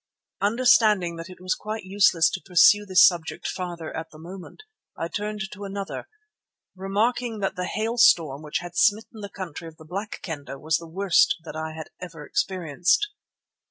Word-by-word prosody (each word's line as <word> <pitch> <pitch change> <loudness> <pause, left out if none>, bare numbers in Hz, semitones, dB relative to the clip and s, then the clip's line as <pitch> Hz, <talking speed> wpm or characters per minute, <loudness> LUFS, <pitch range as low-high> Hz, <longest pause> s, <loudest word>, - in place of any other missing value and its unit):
Understanding 210 -5 +3
that 165 +2 -8
it 185 - -12
was 185 0 0
quite 215 0 -5
useless 185 -4 +4
to 190 - -4
pursue 205 +3 +5
this 185 -1 +7
subject 175 -5 0
farther 175 -3 -5
at 160 0 -5
the 155 - -15
moment, 180 - -11 0.3
I 165 - -2
turned 210 +4 -4
to 205 0 -9
another, 200 0 -6 0.7
remarking 220 +5 -1
that 195 - -1
the 180 0 -3
hailstorm 210 - +3
which 150 +1 -3
had 175 0 -9
smitten 220 +2 +1
the 200 - -6
country 175 -4 -7
of 160 -1 -12
the 160 - -14
Black 200 +6 -5
Kendah 145 -5 -6
was 155 +2 +1
the 165 - -10
worst 190 +2 +3
that 165 - -9
I 160 0 -4
had 160 0 -8
ever 165 -4 -9
experienced. 180 - 0
185 Hz, 170 wpm, -25 LUFS, 165-205 Hz, 0.7 s, this